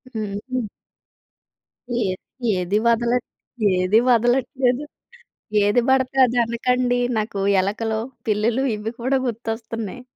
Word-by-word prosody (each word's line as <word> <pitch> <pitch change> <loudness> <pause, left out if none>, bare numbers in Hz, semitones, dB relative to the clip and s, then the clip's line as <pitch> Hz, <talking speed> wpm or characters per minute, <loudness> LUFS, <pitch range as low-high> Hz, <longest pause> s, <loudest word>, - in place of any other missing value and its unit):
హుహు. 215 +3 -3 1.3
ఏది 225 +3 -4
ఏది 180 +3 0
వదలట్ 235 +1 +2 0.5
ఏది 185 +4 +3
వదలట్లేదు. 250 +2 +2 0.8
ఏది 205 +4 +3
పడితే 265 0 +2
అది 245 0 0
అనకండి. 245 +1 0 0.2
నాకు 215 -1 -3 0.2
ఎలకలు, 220 +3 -1 0.3
పిల్లలు 220 +4 +1
ఇవి 210 +2 -4
కూడా 260 +3 +1
గుర్తొస్తున్నాయి. 225 0 -4
230 Hz, 95 wpm, -22 LUFS, 210-250 Hz, 1.3 s, ఏది